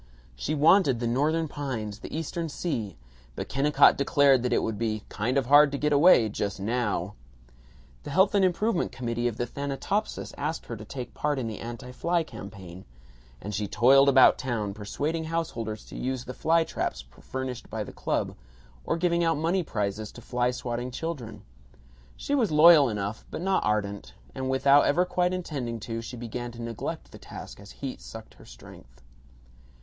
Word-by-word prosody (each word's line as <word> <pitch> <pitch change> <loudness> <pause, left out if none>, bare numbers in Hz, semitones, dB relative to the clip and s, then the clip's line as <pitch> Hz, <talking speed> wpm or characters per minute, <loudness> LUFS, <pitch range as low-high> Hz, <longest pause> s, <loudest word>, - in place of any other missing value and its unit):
She 155 - -2
wanted 150 - +4
the 120 - -2
Northern 150 +7 +1
pines, 120 -8 -5
the - - -9
Eastern 165 +1 -3
sea, 125 - -3 0.4
but - - -5
Kennicott 145 +2 +4
declared 140 -2 +4
that 125 - -1
it - - +2
would 110 -2 -3
be 110 -2 -2
"kind 120 +6 -1
of 135 - +1
hard 145 +2 +6
to 140 - -2
get 150 +1 +1
away, 145 -6 +6
just 100 -1 -3
NOW." 105 -3 -1 0.9
The - - -8
Health 190 +3 +3
and 200 -1 +3
Improvement 185 +2 +1
Committee 120 -1 -2
of 115 -2 -3
the 120 - -1
Thanatopsis 140 - -3
asked 155 +3 -3
her 115 - -6
to 110 0 -10
take 125 +2 -7
part 150 -1 -1
in 130 - -2
the 110 -3 -5
anti 120 +2 -7
fly 170 +6 0
campaign, 100 - -10 0.6
and 105 +8 -6
she 105 +1 -2
toiled 135 +7 +5
about 130 -1 +6
town 115 -6 -2
persuading 145 +11 -3
householders 115 -10 -3
to - - -11
use 130 -1 -3
the 125 - -6
fly 165 +4 +2
traps - - -3 0.2
furnished 130 -2 -5
by - - -3
the - - -10
club, - - -2 0.5
or - - -1
giving 170 0 +1
out 165 -2 +2
money 170 +5 +1
prizes 105 - -3
to 120 - -11
fly 125 0 0
swatting 125 0 -4
children. 125 -7 -6 0.7
She 285 - -3
was 245 -8 +2
loyal 155 -2 +7
enough 105 0 -4
but - - -5
not 190 0 +1
ardent, 100 -1 -2 0.2
and 130 0 -3
without 140 +2 +5
ever 175 +5 +3
quite 180 0 0
intending 140 -10 -4
to, 115 +1 -4
she 120 +2 -8
began 120 +1 -5
to 120 - -9
neglect 115 -2 -5
the - - -12
task - - -10
as 100 0 -13
heat 135 -2 -7
sucked 110 0 -10
at - - -25
her - - -15
strength. - - -15
130 Hz, 185 wpm, -27 LUFS, 110-155 Hz, 0.9 s, loyal